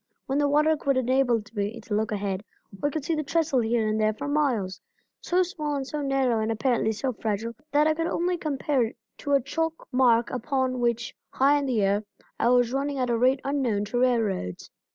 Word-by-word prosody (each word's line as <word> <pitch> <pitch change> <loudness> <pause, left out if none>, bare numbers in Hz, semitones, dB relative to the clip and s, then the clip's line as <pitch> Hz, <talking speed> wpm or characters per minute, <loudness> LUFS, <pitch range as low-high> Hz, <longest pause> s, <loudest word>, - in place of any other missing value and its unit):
When 270 +2 0
the 290 -1 +2
water 305 +2 +4
would 275 -1 +2
enable 255 -3 +2
me 205 +2 -3
to 210 - -6
look 220 +2 0
ahead, 200 -1 -2 0.4
I 290 - +3
could 295 -1 -4
see 330 - 0
the 305 - 0
trestle 310 -2 +1
here 225 -1 +1
and 215 0 0
there 215 0 +2
for 280 +5 -5
miles; 260 -11 0 0.4
so 360 +1 +2
small 305 -5 -3
and 275 -1 -2
so 300 +2 -4
narrow 270 -4 +1
and 220 +1 0
apparently 225 0 +1
so 235 +4 -2
fragile 220 +1 -3 0.2
that 295 +1 +4
I 315 - +3
could 330 +1 -2
only 355 +2 0
compare 290 -4 -1
it 225 - -5 0.2
to 285 - -2
a 275 - +5
chalk 325 +4 -3
mark 240 -3 +3
upon 255 0 -1
which, 235 -1 0 0.2
high 280 +2 +3
in 280 - -2
the 230 -6 +1
air, 200 +2 +1 0.4
I 235 - +3
was 245 -1 +3
running 280 +1 -1
at 250 -2 0
a 235 - +2
rate 260 +2 +3
unknown 255 -7 0
to 245 +4 -2
railroads. 225 - 0
255 Hz, 215 wpm, -26 LUFS, 225-285 Hz, 0.4 s, a